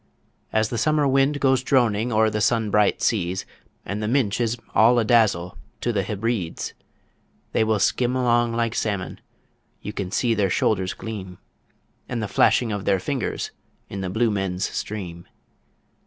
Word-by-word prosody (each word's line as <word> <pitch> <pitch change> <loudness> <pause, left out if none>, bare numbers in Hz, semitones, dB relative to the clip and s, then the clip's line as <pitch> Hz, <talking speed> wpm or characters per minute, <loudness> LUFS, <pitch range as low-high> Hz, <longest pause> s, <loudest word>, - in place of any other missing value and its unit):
As 110 0 +1
the 120 - -2
summer 150 -2 +2
wind 135 +2 +2
goes 130 -2 +3
droning 120 -4 +2
o'er 110 0 +3
the 105 0 -1
sun 110 0 +1
bright 105 -1 +2
seas, 95 -4 0 0.4
And 100 +3 -4
the 105 - -1
Minch 120 -3 +1
is 120 0 0 0.2
all 115 +3 +5
a 115 - +2
dazzle 105 -7 +2 0.2
to 120 - 0
the 100 - +1
Hebrides; 105 -2 -3 0.8
They - - +2
will 110 -1 +1
skim 125 +5 +1
along 120 -2 +2
like 115 -1 0
salmon 100 -6 -3 0.6
you 105 - -6
can 100 -3 -4
see 115 +4 +1
their 100 -3 +1
shoulders 95 0 0
gleam, 95 -5 -7 0.7
And 125 - -2
the 110 - -2
flashing 110 +3 +3
of 100 -2 -4
their 95 - +2
fingers 130 +4 -3 0.4
in 100 - -5
the 95 - -3
Blue 110 +4 +1
Men's 95 -2 -1
Stream. 90 -5 -6
110 Hz, 165 wpm, -23 LUFS, 100-120 Hz, 0.8 s, all